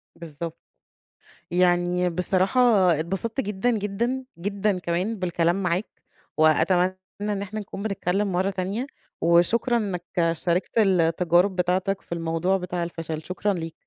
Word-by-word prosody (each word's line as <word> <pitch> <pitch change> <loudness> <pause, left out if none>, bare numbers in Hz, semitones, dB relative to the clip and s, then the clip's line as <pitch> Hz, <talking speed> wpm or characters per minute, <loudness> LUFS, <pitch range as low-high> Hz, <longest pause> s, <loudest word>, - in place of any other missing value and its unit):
بالضبط، 165 -1 -7 0.9
يعني 175 0 +2
بصراحة 185 +6 +1 0.4
اتبسطت 195 - -2
جدًا، 210 +1 -1
جدًا، 235 +6 -2
جدًا 200 +1 -1
كمان 180 +5 -2
بالكلام 175 0 0
معاك، 180 +3 -2 0.3
وأتمنى 175 +4 +3 0.2
إن 205 -1 -2
إحنا 210 +2 -5
نكون 200 -1 -7
بنتكلم 195 -1 -1
مرّه 185 +2 +1
تانية، 195 +6 -3 0.3
وشكرًا 175 +9 +3
إنَّك 195 -6 -2 0.3
شاركت 175 +6 -1
التجارب 180 -1 +3
بتاعتك 185 +2 0
في - - -15
الموضوع 165 +2 0
بتاع 180 -1 -3
الفشل، 165 -2 -5
شكرًا 185 +5 -1
ليك. 165 -2 -5
185 Hz, 120 wpm, -25 LUFS, 170-200 Hz, 0.9 s, وأتمنى